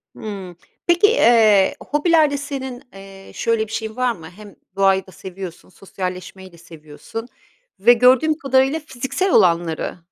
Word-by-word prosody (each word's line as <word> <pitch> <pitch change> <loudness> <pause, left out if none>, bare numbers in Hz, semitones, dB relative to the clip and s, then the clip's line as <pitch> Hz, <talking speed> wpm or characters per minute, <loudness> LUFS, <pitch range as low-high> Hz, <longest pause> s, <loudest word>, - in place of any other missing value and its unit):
Hımm. 195 -5 -8 0.3
Peki, 345 +4 +4
eee, 225 - +4 0.2
hobilerde 300 -1 +2
senin, 265 -3 -6
eee, 195 0 -13
şöyle 225 -2 -1
bir - - -13
şeyin 220 0 -5
var 255 -1 0
mı? 165 -6 -10
Hem 205 +2 -14 0.2
doğayı 195 -1 +2
da - - -14
seviyorsun, 185 -2 -10
sosyalleşmeyi 185 0 -8
de 170 - -18
seviyorsun 165 +8 -10 0.5
ve 240 +5 +6
gördüğüm 255 +6 +3
kadarıyla 270 +1 +1
fiziksel 285 +6 -3
olanları, 170 -4 +1
220 Hz, 135 wpm, -20 LUFS, 190-265 Hz, 0.5 s, ve